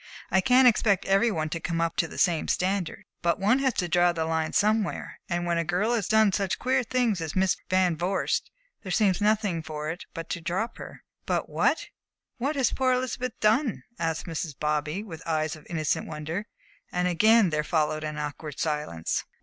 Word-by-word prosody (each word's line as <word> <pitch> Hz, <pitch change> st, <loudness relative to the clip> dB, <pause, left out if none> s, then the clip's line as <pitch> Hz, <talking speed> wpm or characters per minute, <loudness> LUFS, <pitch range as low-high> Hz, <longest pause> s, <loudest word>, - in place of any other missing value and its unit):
I 190 Hz, -, +4 dB
can't 250 Hz, +5 st, +6 dB
expect 210 Hz, -4 st, +3 dB
every 195 Hz, +5 st, +3 dB
one 155 Hz, -6 st, -2 dB
to 165 Hz, -, -3 dB
come 165 Hz, 0 st, -2 dB
up 165 Hz, 0 st, 0 dB
to 165 Hz, -, +2 dB
the -, -, -10 dB
same 170 Hz, -4 st, +2 dB
standard. 185 Hz, -2 st, -1 dB, 0.2 s
But 170 Hz, 0 st, +2 dB
one 215 Hz, +7 st, +3 dB
has 265 Hz, -2 st, +1 dB
to 180 Hz, -3 st, 0 dB
draw 175 Hz, +1 st, +4 dB
the 165 Hz, -2 st, -2 dB
line 160 Hz, -1 st, -1 dB
somewhere, 215 Hz, 0 st, 0 dB
and 175 Hz, -1 st, -1 dB
when 170 Hz, -1 st, +1 dB
a -, -, +1 dB
girl 195 Hz, +8 st, 0 dB
has 220 Hz, -6 st, 0 dB
done 220 Hz, -2 st, +4 dB
such 195 Hz, -2 st, 0 dB
queer 260 Hz, +1 st, +1 dB
things 240 Hz, -6 st, 0 dB
as 160 Hz, -2 st, -4 dB
Miss 190 Hz, 0 st, +3 dB
Van 185 Hz, -2 st, +3 dB
Vorst, 180 Hz, +4 st, -1 dB, 0.3 s
there 190 Hz, -, -6 dB
seems 195 Hz, -2 st, +2 dB
nothing 205 Hz, -5 st, +1 dB
for 155 Hz, 0 st, -4 dB
it 175 Hz, -, -8 dB
but 165 Hz, -1 st, -5 dB
to 170 Hz, -, -3 dB
drop 190 Hz, +7 st, -2 dB
her." -, -, -10 dB, 0.2 s
"But -, -, -1 dB
what -, -, +1 dB, 0.5 s
what 280 Hz, +5 st, -1 dB
has 265 Hz, -4 st, +1 dB
poor 260 Hz, -1 st, +2 dB
Elizabeth 255 Hz, -1 st, -2 dB
done?" 225 Hz, +4 st, +2 dB, 0.2 s
asked 165 Hz, -1 st, -1 dB
Mrs. 165 Hz, -3 st, -4 dB
Bobby, 150 Hz, +5 st, -1 dB
with 165 Hz, -7 st, -9 dB
eyes 155 Hz, -1 st, 0 dB
of 155 Hz, -, -15 dB
innocent 155 Hz, -3 st, -1 dB
wonder, 160 Hz, +6 st, -4 dB, 0.4 s
and 180 Hz, 0 st, 0 dB
again 215 Hz, +2 st, +4 dB
there 150 Hz, 0 st, 0 dB
followed 155 Hz, -1 st, 0 dB
an 150 Hz, -1 st, -4 dB
awkward 150 Hz, 0 st, -5 dB
silence. 150 Hz, -, -2 dB
175 Hz, 200 wpm, -27 LUFS, 160-215 Hz, 0.5 s, can't